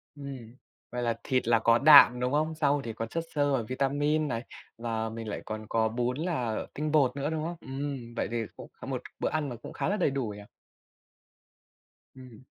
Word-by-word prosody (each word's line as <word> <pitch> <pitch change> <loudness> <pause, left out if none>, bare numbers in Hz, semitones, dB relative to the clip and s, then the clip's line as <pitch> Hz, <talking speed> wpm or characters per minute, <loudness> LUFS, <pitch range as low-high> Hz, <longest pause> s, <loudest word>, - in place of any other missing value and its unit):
Ừm. 135 -5 -8 0.4
Vậy 125 - -3
là 115 -1 -1
thịt 130 -4 0
là 115 -1 +5
có 115 +1 +4
đạm, 140 -3 +8
đúng 125 +1 0
không? 155 +2 +1
Rau 145 -2 +2
thì 115 - -5
còn 115 +1 -4
chất 165 +6 -2
xơ 145 -1 +2
và 130 - +2
vitamin 145 +4 +1
này. 115 -3 -3 0.3
Và 115 -1 -2
mình 115 0 -6
lại 105 - -4
còn 110 0 -5
có 110 -1 +2
bún 125 +3 -1
là 130 -10 -2
tinh 150 +1 -2
bột 140 -5 +3
nữa, 140 +1 -1
đúng 160 -1 -2
không? 170 +2 -3
Ừm, 135 -3 -5
vậy - - -1
thì 120 - -1 0.2
cũng - - -10
có - - -8
một - - -3 0.2
bữa - - 0
ăn 145 -6 -2
cũng - - -9
khá - - -1
là 205 - +1
đầy 145 - +2
đủ 135 -3 -2
nhỉ. 105 0 -8 1.7
Ừm. 130 -2 -13
130 Hz, 210 wpm, -29 LUFS, 115-145 Hz, 1.7 s, đạm